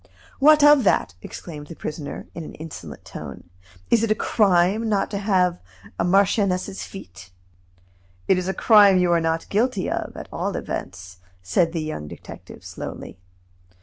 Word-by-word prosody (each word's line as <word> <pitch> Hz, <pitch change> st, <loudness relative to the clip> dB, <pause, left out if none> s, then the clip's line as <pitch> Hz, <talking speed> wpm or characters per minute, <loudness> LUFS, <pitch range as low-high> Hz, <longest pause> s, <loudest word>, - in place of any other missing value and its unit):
"What 300 Hz, +1 st, +6 dB
of 295 Hz, -2 st, +7 dB
that?" 100 Hz, -, +2 dB
exclaimed 150 Hz, -, -9 dB
the 165 Hz, -, -9 dB
prisoner, 150 Hz, -2 st, -6 dB
in 165 Hz, -, -7 dB
an -, -, -10 dB
insolent 160 Hz, 0 st, -10 dB
tone. 75 Hz, +3 st, -10 dB, 0.4 s
"Is 230 Hz, -, +4 dB
it 230 Hz, -, 0 dB
a 215 Hz, -, +3 dB
crime 200 Hz, +1 st, +2 dB
not 200 Hz, -2 st, 0 dB
to 200 Hz, -, -2 dB
have 185 Hz, -4 st, +1 dB, 0.4 s
a -, -, +2 dB
marchioness's 195 Hz, +1 st, +1 dB
feet?" 95 Hz, -, -11 dB, 1.0 s
"It 185 Hz, -, +3 dB
is 180 Hz, -, -4 dB
a 190 Hz, -, 0 dB
crime 205 Hz, -4 st, +6 dB
you 180 Hz, -1 st, +2 dB
are 170 Hz, -1 st, +3 dB
not 165 Hz, 0 st, -1 dB
guilty 215 Hz, -2 st, 0 dB
of, -, -, -4 dB
at -, -, -8 dB
all -, -, -2 dB
events," 90 Hz, +1 st, -6 dB, 0.3 s
said 135 Hz, -, +1 dB
the 165 Hz, -2 st, -3 dB
young 155 Hz, -, -5 dB
detective -, -, -12 dB
slowly. -, -, -8 dB
180 Hz, 160 wpm, -23 LUFS, 160-205 Hz, 1.0 s, of